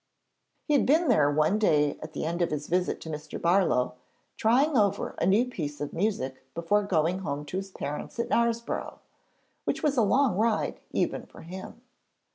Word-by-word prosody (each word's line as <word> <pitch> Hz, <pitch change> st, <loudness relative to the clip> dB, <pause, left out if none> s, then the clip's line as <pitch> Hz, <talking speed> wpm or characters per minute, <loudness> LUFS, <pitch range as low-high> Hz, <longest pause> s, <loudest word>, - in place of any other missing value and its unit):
] -, -, -49 dB
He 300 Hz, -, 0 dB
had 285 Hz, -, +3 dB
been 315 Hz, +3 st, +4 dB
there 150 Hz, -12 st, +4 dB
one 155 Hz, +8 st, +2 dB
day 150 Hz, -8 st, +2 dB
at -, -, -8 dB
the -, -, -3 dB
end 170 Hz, +2 st, -2 dB
of 170 Hz, -, +2 dB
his 150 Hz, -1 st, -3 dB
visit 180 Hz, +1 st, 0 dB
to 160 Hz, -, -8 dB
Mr. 150 Hz, 0 st, -6 dB
Barlow, 170 Hz, -9 st, +2 dB, 0.4 s
trying 270 Hz, +7 st, +3 dB
over 200 Hz, -3 st, +2 dB
a -, -, +1 dB
new 210 Hz, +6 st, +4 dB
piece 150 Hz, -12 st, -5 dB
of 145 Hz, -, -4 dB
music 165 Hz, -10 st, -2 dB
before 170 Hz, +5 st, +2 dB
going 180 Hz, -2 st, +1 dB
home 145 Hz, -5 st, -4 dB
to 165 Hz, +6 st, -4 dB
his 195 Hz, 0 st, -4 dB
parents 150 Hz, -1 st, -6 dB
at 235 Hz, 0 st, -1 dB
Knaresborough, 235 Hz, -1 st, 0 dB, 0.7 s
which -, -, -2 dB
was 290 Hz, -3 st, +1 dB
a -, -, +5 dB
long 230 Hz, -1 st, +3 dB
ride 220 Hz, 0 st, +1 dB
even -, -, -1 dB
for -, -, -14 dB
him. 190 Hz, +7 st, -9 dB
190 Hz, 190 wpm, -28 LUFS, 155-230 Hz, 0.7 s, a